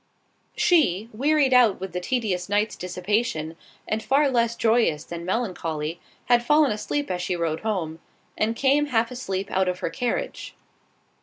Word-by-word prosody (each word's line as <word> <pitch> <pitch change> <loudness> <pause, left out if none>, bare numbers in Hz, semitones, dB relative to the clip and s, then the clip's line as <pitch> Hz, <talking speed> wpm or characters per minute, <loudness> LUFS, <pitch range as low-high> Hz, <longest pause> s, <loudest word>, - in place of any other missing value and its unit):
She, 230 - +2
wearied 280 +3 +2
out 240 -6 +5
with 190 -1 -6
the 180 - -2
tedious 195 -4 -2
night's 210 +2 +1
dissipation, 180 -3 -2 0.3
and 215 +1 -1
far 275 +3 +2
less 235 -2 +1
joyous 225 -10 +2
than 170 0 -7
melancholy, 170 -6 -2 0.3
had 240 -1 +3
fallen 295 +2 +4
asleep 250 +5 -2
as 180 -1 -2
she 180 0 -1
rode 165 -2 -1
home, 175 -7 -3 0.4
and 220 +2 0
came 280 +4 +2
half 230 -3 +1
asleep 195 -6 -4
out 190 0 +1
of 180 0 -1
her - - -2
carriage. 385 - -3
215 Hz, 155 wpm, -24 LUFS, 180-250 Hz, 0.4 s, out